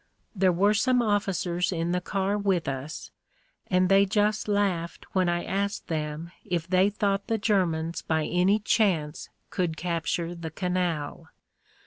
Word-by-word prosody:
There 185 -1 +4
were 200 +4 +3
some 250 +4 +3
officers 190 -4 0
in 170 -1 -1
the 180 0 0
car 195 +2 -1
with 195 -4 0
us, 135 +3 -5 0.6
and 185 0 +3
they 195 +1 +5
just 210 +2 +1
laughed 195 -5 -1
when 185 -2 +2
I 175 0 0
asked 200 +2 -2
them 155 +1 -3
if 170 -2 -2
they 185 +2 +4
thought 200 -1 -1
the 225 - +1
Ger 205 -4 +2
mans 165 +1 -3
by 160 -1 0
any 180 +4 +3
chance 180 -8 0 0.2
could 175 -4 -1
capture 170 0 -2
the 170 -2 -6
canal. 175 -3 -2
180 Hz, 150 wpm, -27 LUFS, 170-200 Hz, 0.6 s, they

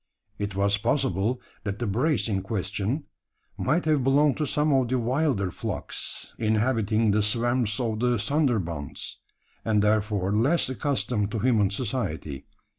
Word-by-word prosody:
It 100 -1 -3
was 100 +1 +2
possible 115 0 0 0.2
that 100 -2 -3
the 120 - -2
brace 115 +2 +1
in 100 -3 0
question 100 - -2 0.5
might 160 +7 0
have 150 -4 +2
belonged 140 +2 +3
to 150 -1 -1
some 150 +2 +2
of 130 -2 +3
the 130 +2 +1
wilder 125 - 0
flocks - - -5
inhabiting 110 -1 +2
the 105 +1 +3
swamps 115 +1 +1
of 110 -3 -1
the 125 0 +2
Sunderbunds 105 - -1 0.5
and 105 -2 +2
therefore 105 -2 +1
less 135 +8 +2
accustomed 115 -6 -1
to 110 - -3
human 110 -3 +3
society. 100 - -3
110 Hz, 140 wpm, -26 LUFS, 100-130 Hz, 0.5 s, belonged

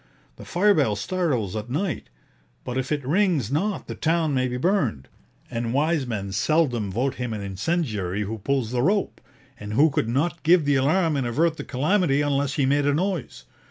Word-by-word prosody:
The - - -11
fire 205 +4 +3
bell 135 - +2
startles 125 - -1
at 110 +2 -5
night; 155 - -2 0.5
but 125 - -5
if 130 +1 -2
it 145 -3 -1
rings 160 - +1
not 190 +8 -1
the - - -6
town 160 -2 0
may 130 -1 +1
be 125 0 -3
burned; 130 - 0 0.4
and 115 +1 -2
wise 150 -1 +1
men 100 -4 -4
seldom 120 - +1
vote 125 +7 0
him 125 -2 -2
an 105 - -4
incendiary 105 - -2
who 110 +2 -5
pulls 130 +1 -1
the 125 -1 0
rope, 200 +8 0 0.4
and 105 +1 -6
who 150 +7 +4
could 115 -4 -1
not 160 +7 0
give 165 0 +4
the 145 0 +3
alarm 155 +4 +2
and 130 -3 -1
avert 160 +7 +1
the - - -5
calamity 145 +1 +1
unless 140 -1 0
he 140 - +2
made 145 +1 +2
a 145 - +2
noise. 175 - -3
140 Hz, 195 wpm, -24 LUFS, 115-165 Hz, 0.5 s, who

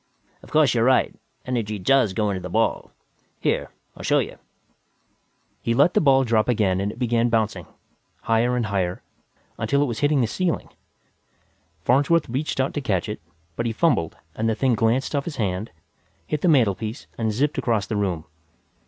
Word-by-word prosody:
Of - - -15
course 155 -2 +4
you're 115 -2 +2
right; 130 +1 +3 0.3
energy 115 -4 -2
does 110 +1 +3
go 105 0 0
into 95 - -2
the 90 - -6
ball. 110 +5 0 0.5
Here, - - 0 0.3
I'll - - -10
show - - +2
you." - - -2 1.2
He 115 - 0
let 145 +7 +4
the - - +3
ball 135 -3 +5
drop 115 -2 +1
again 100 -5 +2
and 100 +1 -1
it - - -12
began 120 -1 +1
bouncing, 110 -6 0 0.6
higher 115 +2 +2
and 120 -2 0
higher, 95 -3 -2 0.6
until 140 +1 +2
it - - +2
was 120 -5 -3
hitting 145 -1 +3
the - - +3
ceiling. 175 +9 -2 1.1
Farnsworth 145 - +3
reached 135 +4 -3
out 130 - +1
to 145 - -2
catch 95 -9 -1
it, 105 -4 -5 0.3
but 115 - -1
he - - 0
fumbled 115 - +1 0.2
and 110 +1 -1
the 110 - +1
thing 130 +1 +2
glanced 115 +6 +1
off 140 - -1
his 165 - -5
hand, 100 -2 -2 0.6
hit 150 -1 -2
the - - +2
mantelpiece 115 - +1
and 110 -1 0
zipped 140 +7 0
across 110 -5 0
the 110 - -3
room. 90 -6 -1
115 Hz, 180 wpm, -23 LUFS, 105-135 Hz, 1.2 s, ball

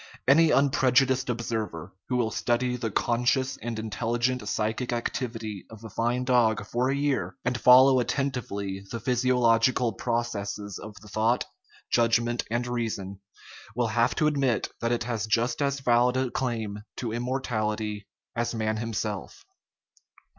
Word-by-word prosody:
Any 160 +4 +6
unprejudiced 135 -2 +3
observer, 110 -7 -3 0.2
who 125 - 0
will 120 -2 +1
study 125 +3 0
the 120 -2 -3
conscious 125 +5 +1
and 115 0 -5
intelligent 115 +2 -1
psychic 110 +4 -1
activity 115 -4 -4
of 110 0 -12
a 110 - -9
fine 120 +2 0
dog 120 -4 +2
for 125 +5 0
a 135 - +1
year, 135 -11 -1
and 125 0 +1
follow 130 +1 +7
attentively 110 -7 -2
the 115 - -4
physiological 125 -1 +2
processes 105 -4 -3
of 105 +1 -9
its 105 0 -15
thought, 110 +3 +1 0.5
judgment, 120 0 +2
and 120 +2 -1
reason, 110 -6 -3 0.6
will 120 -1 +1
have 120 +2 +2
to 155 - +1
admit 140 -6 +1
that 115 0 0
it 120 -1 0
has 115 -2 -2
just 120 +4 +1
as 140 -1 0
valid 125 0 +3
a 130 -2 0
claim 110 -5 -2 0.2
to 115 -3 -3
im 120 - -2
mortality 110 -5 -2 0.3
as 120 0 -1
man 110 -1 -1
himself. 110 -3 -4
120 Hz, 145 wpm, -27 LUFS, 110-125 Hz, 0.6 s, follow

